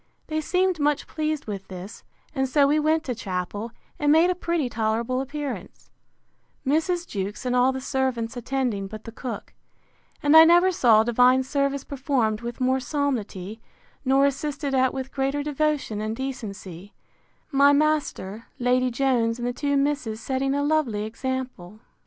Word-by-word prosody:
They 310 Hz, 0 st, -2 dB
seemed 365 Hz, +1 st, +1 dB
much 295 Hz, 0 st, +1 dB
pleased 310 Hz, -1 st, -3 dB
with 200 Hz, -3 st, -6 dB
this; 185 Hz, +2 st, -9 dB, 0.3 s
and 265 Hz, -3 st, 0 dB
so 285 Hz, +1 st, +4 dB
we 295 Hz, +2 st, +3 dB
went 310 Hz, +1 st, +2 dB
to 255 Hz, -, -3 dB
chapel, 205 Hz, +1 st, -4 dB, 0.3 s
and 295 Hz, -1 st, +3 dB
made 330 Hz, +4 st, +5 dB
a -, -, +2 dB
pretty 340 Hz, -5 st, -1 dB
tolerable 230 Hz, +2 st, -1 dB
appearance; 270 Hz, -8 st, -6 dB, 0.7 s
Mrs. 335 Hz, +5 st, 0 dB
Jewkes, 205 Hz, +3 st, -4 dB
and 250 Hz, 0 st, 0 dB
all 250 Hz, +1 st, +4 dB
the 265 Hz, -, -4 dB
servants, 260 Hz, -3 st, -1 dB
attending, 245 Hz, -5 st, -2 dB
but 215 Hz, +2 st, -9 dB
the 230 Hz, -, -8 dB
cook: 240 Hz, +1 st, -7 dB, 0.7 s
And 290 Hz, +1 st, +4 dB
I 320 Hz, -, +11 dB
never 350 Hz, +3 st, +5 dB
saw 230 Hz, -10 st, +5 dB
divine 250 Hz, +3 st, +4 dB
service 275 Hz, +1 st, -1 dB
performed 255 Hz, -6 st, -1 dB
with 240 Hz, +1 st, -6 dB
more 260 Hz, +1 st, +2 dB
solemnity, 225 Hz, -, -3 dB, 0.4 s
nor 270 Hz, +1 st, +4 dB
assisted 280 Hz, 0 st, -2 dB
at 260 Hz, -1 st, +3 dB
with 265 Hz, 0 st, -5 dB
greater 275 Hz, +1 st, -1 dB
devotion 295 Hz, -7 st, -1 dB
and 215 Hz, +1 st, -2 dB
decency; 205 Hz, -7 st, -7 dB, 0.6 s
my 280 Hz, 0 st, +5 dB
master, 285 Hz, -8 st, 0 dB
Lady 250 Hz, +1 st, +2 dB
Jones, 240 Hz, -2 st, +1 dB
and 240 Hz, 0 st, -3 dB
the 245 Hz, -, -1 dB
two 285 Hz, +2 st, 0 dB
misses, 275 Hz, -6 st, -1 dB
setting 270 Hz, +3 st, -1 dB
a 285 Hz, -, 0 dB
lovely 285 Hz, -9 st, +1 dB
example. 230 Hz, -4 st, -5 dB
260 Hz, 160 wpm, -25 LUFS, 225-290 Hz, 0.7 s, I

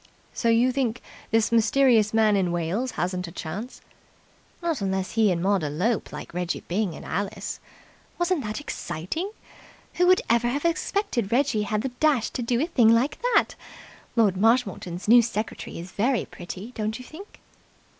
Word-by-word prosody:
"So 235 Hz, -, 0 dB
you 235 Hz, +3 st, +4 dB
think 255 Hz, -3 st, -1 dB, 0.3 s
this 225 Hz, 0 st, +2 dB
mysterious 230 Hz, -1 st, +4 dB
man 220 Hz, -2 st, +4 dB
in 185 Hz, -3 st, +1 dB
Wales 175 Hz, +9 st, -1 dB
hasn't 180 Hz, 0 st, -2 dB
a -, -, -8 dB
chance?" 190 Hz, +9 st, -6 dB, 0.8 s
"Not 330 Hz, -, -2 dB
unless 190 Hz, -1 st, -1 dB
he 220 Hz, -3 st, +3 dB
and 170 Hz, -1 st, -1 dB
Maud 195 Hz, -1 st, +2 dB
elope 180 Hz, +10 st, -1 dB
like -, -, -8 dB
Reggie 175 Hz, 0 st, -3 dB
Byng 185 Hz, -2 st, -1 dB
and -, -, -10 dB
Alice. 200 Hz, +3 st, -3 dB, 0.6 s
Wasn't 350 Hz, -4 st, 0 dB
that 215 Hz, 0 st, -4 dB
exciting? 295 Hz, -, -4 dB, 0.7 s
Who 360 Hz, -, +4 dB
would 370 Hz, 0 st, +5 dB
ever 235 Hz, +1 st, +3 dB
have 280 Hz, +4 st, -1 dB
suspected 335 Hz, -, -1 dB
Reggie 250 Hz, -3 st, +2 dB
had 215 Hz, 0 st, 0 dB
the 265 Hz, -, -1 dB
dash 290 Hz, -8 st, +2 dB
to -, -, -4 dB
do 240 Hz, 0 st, 0 dB
a 300 Hz, -, +2 dB
thing 250 Hz, -10 st, +4 dB
like 235 Hz, +5 st, +2 dB
that? -, -, +3 dB, 0.6 s
Lord 210 Hz, -5 st, +3 dB
Marshmoreton's 195 Hz, -5 st, +1 dB
new 240 Hz, +2 st, +8 dB
secretary 220 Hz, -1 st, -4 dB
is 175 Hz, +2 st, -8 dB
very 235 Hz, +3 st, +1 dB
pretty, 185 Hz, +5 st, -8 dB
don't 220 Hz, -2 st, -3 dB
you 255 Hz, -, -11 dB
think?" 370 Hz, -, -12 dB
225 Hz, 165 wpm, -25 LUFS, 190-255 Hz, 0.8 s, new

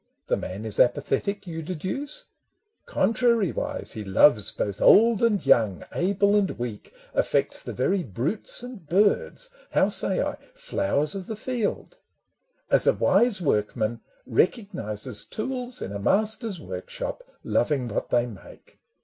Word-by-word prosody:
The -, -, +1 dB
man 100 Hz, +4 st, -6 dB
is 110 Hz, -, -4 dB
apathetic, 195 Hz, +10 st, +1 dB
you 165 Hz, -2 st, -5 dB
deduce? 190 Hz, -, -4 dB, 0.6 s
Contrariwise, 225 Hz, -1 st, +1 dB
he 110 Hz, -, -5 dB
loves 105 Hz, +3 st, +4 dB
both 100 Hz, -1 st, -3 dB
old 225 Hz, 0 st, +6 dB
and 225 Hz, -4 st, +2 dB
young, 110 Hz, -6 st, +3 dB
Able 200 Hz, +3 st, +2 dB
and 200 Hz, -2 st, +3 dB
weak, 120 Hz, -4 st, -6 dB, 0.2 s
affects -, -, +1 dB
the -, -, -6 dB
very 185 Hz, +10 st, +1 dB
brutes 150 Hz, -, -2 dB
And 245 Hz, -7 st, -9 dB
birds— 210 Hz, -, +1 dB, 0.2 s
how -, -, +4 dB
say -, -, +2 dB
I? -, -, -1 dB, 0.2 s
flowers 295 Hz, -, -1 dB
of 195 Hz, -2 st, -6 dB
the 220 Hz, -, -4 dB
field 250 Hz, -, -3 dB, 0.4 s
—. -, -, -38 dB
As -, -, +4 dB
a -, -, +6 dB
wise 235 Hz, -5 st, +3 dB
workman 110 Hz, -2 st, 0 dB, 0.2 s
recognizes 125 Hz, -, -1 dB
tools 250 Hz, +2 st, -4 dB
In 95 Hz, -, -5 dB
a 100 Hz, -, -4 dB
master's 215 Hz, -, +1 dB
workshop, 95 Hz, -, -6 dB, 0.2 s
loving 135 Hz, -5 st, +1 dB
what 105 Hz, -, -3 dB
they 120 Hz, 0 st, +2 dB
make. 115 Hz, -5 st, -13 dB
185 Hz, 140 wpm, -25 LUFS, -, 0.6 s, old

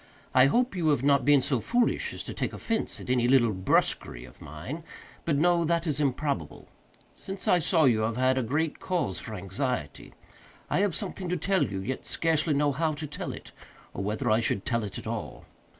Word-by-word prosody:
I 130 Hz, +1 st, +6 dB
hope 245 Hz, -, +1 dB
you 170 Hz, -3 st, 0 dB
have 145 Hz, -4 st, +2 dB
not 140 Hz, -1 st, +3 dB
been 145 Hz, -2 st, +5 dB
so 130 Hz, -5 st, +1 dB
foolish 240 Hz, -, +1 dB
as -, -, -5 dB
to -, -, -6 dB
take -, -, -3 dB
offence 225 Hz, -1 st, -2 dB
at -, -, -9 dB
any 125 Hz, -1 st, +2 dB
little 120 Hz, -4 st, +4 dB
brusquerie 95 Hz, -9 st, 0 dB
of -, -, -17 dB
mine; 85 Hz, -, -7 dB, 0.4 s
but 155 Hz, -4 st, +1 dB
no, 170 Hz, +2 st, +3 dB
that 170 Hz, +1 st, 0 dB
is 150 Hz, -3 st, -1 dB
improbable. 135 Hz, -, -2 dB, 0.5 s
Since 195 Hz, 0 st, -6 dB
I 180 Hz, -, +5 dB
saw 165 Hz, 0 st, +3 dB
you 120 Hz, -6 st, +4 dB
I 110 Hz, -, +1 dB
have 115 Hz, +1 st, -4 dB
had 130 Hz, -1 st, +2 dB
great 150 Hz, +4 st, -1 dB
cause 170 Hz, -, -1 dB
for 110 Hz, -, -7 dB
anxiety. 95 Hz, -, -4 dB, 0.6 s
I -, -, +2 dB
have 200 Hz, -5 st, +1 dB
something 190 Hz, -3 st, -3 dB
to 180 Hz, -, 0 dB
tell 195 Hz, -2 st, +1 dB
you, 95 Hz, -6 st, -3 dB
yet 130 Hz, +7 st, -4 dB
scarcely 160 Hz, -2 st, +2 dB
know 145 Hz, 0 st, +2 dB
how 155 Hz, +3 st, 0 dB
to 150 Hz, +1 st, -5 dB
tell 150 Hz, -, -5 dB
it, -, -, -10 dB, 0.4 s
or 95 Hz, -, -4 dB
whether 105 Hz, +2 st, -1 dB
I 110 Hz, -, +4 dB
should 105 Hz, -4 st, -1 dB
tell 115 Hz, -1 st, 0 dB
it 100 Hz, -, -6 dB
at -, -, -8 dB
all. -, -, -5 dB
140 Hz, 210 wpm, -28 LUFS, 115-165 Hz, 0.6 s, I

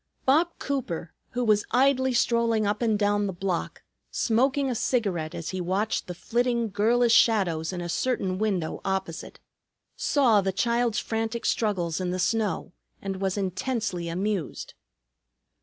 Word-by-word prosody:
Bob 310 Hz, +6 st, +4 dB
Cooper, 195 Hz, -, -3 dB, 0.2 s
who 245 Hz, 0 st, 0 dB
was 210 Hz, -2 st, +3 dB
idly 260 Hz, +1 st, +3 dB
strolling 235 Hz, -2 st, +2 dB
up 205 Hz, +2 st, -1 dB
and 220 Hz, -3 st, +2 dB
down 205 Hz, 0 st, +1 dB
the -, -, -2 dB
block, 180 Hz, -1 st, -3 dB, 0.3 s
smoking 265 Hz, +4 st, +1 dB
a 255 Hz, -, 0 dB
cigarette, 200 Hz, -10 st, -1 dB
as 165 Hz, -, -5 dB
he 185 Hz, -1 st, -3 dB
watched 195 Hz, +5 st, -1 dB
the 180 Hz, -, -6 dB
flitting 235 Hz, +3 st, 0 dB
girlish 230 Hz, +4 st, +3 dB
shadows 185 Hz, -9 st, +3 dB
in 180 Hz, -1 st, -4 dB
a 175 Hz, -, -4 dB
certain 190 Hz, -2 st, -1 dB
window 195 Hz, -7 st, -1 dB
opposite, 190 Hz, -4 st, -3 dB, 0.6 s
saw 240 Hz, -8 st, +3 dB
the 195 Hz, 0 st, 0 dB
child's 235 Hz, +2 st, +1 dB
frantic 225 Hz, +1 st, -2 dB
struggles 185 Hz, -6 st, 0 dB
in 180 Hz, -, -1 dB
the 180 Hz, -, -1 dB
snow 205 Hz, -2 st, -1 dB, 0.3 s
and 195 Hz, -1 st, -4 dB
was 190 Hz, 0 st, 0 dB
intensely 190 Hz, -2 st, -2 dB
amused. 190 Hz, -1 st, -3 dB
210 Hz, 145 wpm, -26 LUFS, 185-235 Hz, 0.6 s, Bob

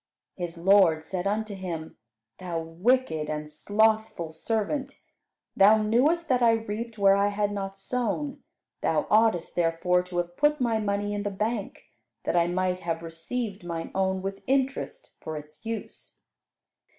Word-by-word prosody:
His 175 Hz, -2 st, -5 dB
lord 175 Hz, -3 st, +5 dB
said 180 Hz, +3 st, -3 dB
unto 215 Hz, +1 st, -1 dB
him, 175 Hz, -5 st, -5 dB, 0.4 s
"Thou 175 Hz, -3 st, -3 dB
wicked 165 Hz, -1 st, 0 dB
and 150 Hz, 0 st, -3 dB
slothful 215 Hz, +1 st, +1 dB
servant. 225 Hz, -, -2 dB, 0.6 s
Thou 205 Hz, +3 st, +7 dB
knewest 270 Hz, +11 st, +2 dB
that 255 Hz, -3 st, +2 dB
I 230 Hz, -1 st, +6 dB
reaped 225 Hz, +1 st, -4 dB
where 195 Hz, -1 st, +5 dB
I 200 Hz, +1 st, +3 dB
had 205 Hz, 0 st, 0 dB
not 195 Hz, -1 st, -4 dB
sown; 250 Hz, +6 st, -2 dB, 0.4 s
thou -, -, +1 dB
oughtest 215 Hz, -6 st, +3 dB
therefore 175 Hz, +1 st, +2 dB
to 180 Hz, 0 st, -7 dB
have 175 Hz, 0 st, -2 dB
put 295 Hz, +1 st, +3 dB
my 230 Hz, -3 st, +1 dB
money 205 Hz, 0 st, -1 dB
in 205 Hz, -, -2 dB
the 205 Hz, -, -1 dB
bank, 210 Hz, +1 st, -3 dB, 0.4 s
that -, -, -1 dB
I 170 Hz, -1 st, +4 dB
might 185 Hz, +1 st, 0 dB
have 165 Hz, -1 st, -3 dB
received 190 Hz, +6 st, -4 dB
mine 170 Hz, -1 st, -5 dB
own 190 Hz, 0 st, 0 dB
with 195 Hz, 0 st, -4 dB
interest 270 Hz, -, -1 dB
for 155 Hz, -1 st, -5 dB
its 150 Hz, 0 st, -12 dB
use. 225 Hz, -1 st, -6 dB
200 Hz, 150 wpm, -27 LUFS, 175-225 Hz, 0.6 s, Thou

